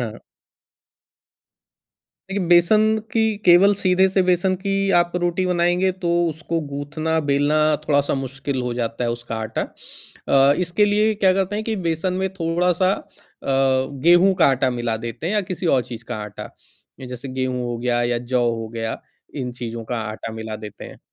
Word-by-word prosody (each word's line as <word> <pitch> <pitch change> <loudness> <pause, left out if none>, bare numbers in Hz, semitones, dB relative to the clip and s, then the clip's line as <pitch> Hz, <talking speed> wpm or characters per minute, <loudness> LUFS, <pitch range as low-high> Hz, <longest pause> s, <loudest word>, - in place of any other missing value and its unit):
हाँ। 115 -2 -5 2.1
देखिए 195 -1 -1
बेसन 175 +5 +5 0.3
की 225 - +2 0.2
केवल 180 +3 +6
सीधे 185 -1 +3
से 190 0 +2
बेसन 180 +1 +2
की 195 +1 -2 0.2
आप 175 0 +1
रोटी 175 +1 0
बनाएँगे 175 +1 +2
तो - - +1 0.2
उसको 165 +1 -3
गूँथना 155 +3 -2
बेलना 145 +2 +2 0.3
थोड़ा 145 -1 +4
सा 145 - -1
मुश्किल 135 0 -4
हो 125 -1 -2
जाता 120 0 -2
है 120 - 0
उसका 120 -1 -5
आटा। 110 0 -3 0.7
अ, 135 +1 +5
इसके 180 +3 +2
लिए 210 +1 +2
क्या 195 -3 +3
करते 195 +2 -1
हैं 215 - -3
कि 220 -1 -2
बेसन 165 +3 0
में 190 - +1
थोड़ा-सा 180 +1 +1
अ, - - -4 0.4
गेहूँ 135 +7 +3
का - - +6
आटा 130 -1 +2
मिला 120 -2 -2
देते 115 +7 -6
हैं 185 - -1
या 210 - +3
किसी 180 -1 -3
और 135 -5 +3
चीज़ 120 -1 -9
का 120 - -3
आटा। 105 - -9 0.6
जैसे 125 +2 -7
गेहूँ 130 -1 -2
हो 120 -1 -3
गया 120 0 0
या 120 0 0
जौ 125 -1 +2
हो 115 -1 -4
गया 115 0 -4 0.3
इन 130 -4 -3
चीज़ों 115 -1 -6
का 120 +1 -3
आटा 110 +1 -7
मिला 110 -1 -6
देते 105 -1 -10
हैं। - - -11
145 Hz, 175 wpm, -21 LUFS, 120-180 Hz, 2.1 s, केवल